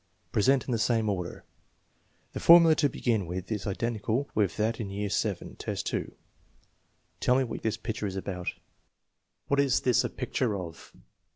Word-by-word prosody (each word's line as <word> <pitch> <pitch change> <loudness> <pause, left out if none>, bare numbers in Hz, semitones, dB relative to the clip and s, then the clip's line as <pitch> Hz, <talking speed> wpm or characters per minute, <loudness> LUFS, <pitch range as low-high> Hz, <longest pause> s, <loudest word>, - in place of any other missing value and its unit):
Present 130 +4 +3
in - - -2
the 115 - +1
same 115 -2 +2
order. 90 -3 -4 0.9
The - - -4
formula 165 -1 +8
to 150 -2 +2
begin 110 -7 -1
with 90 +4 -5
is 105 -2 -2
identical 115 +5 -1
with 100 -6 +1
that 110 +2 0
in 105 -4 -4
VII. 100 0 -2
2: - - -3 0.5
" - - -43
Tell 125 - +3
me 135 - +3
what 120 - -5
this 110 0 -1
picture 110 -2 -3
is 95 - -5
about. 90 -2 -5 1.0
What 140 - +1
is 140 -2 +3
this 125 -2 +3
a - - -1
pic 125 - -6
ture 115 -6 +1
of?" 85 -3 -9
110 Hz, 170 wpm, -28 LUFS, 100-125 Hz, 1.0 s, formula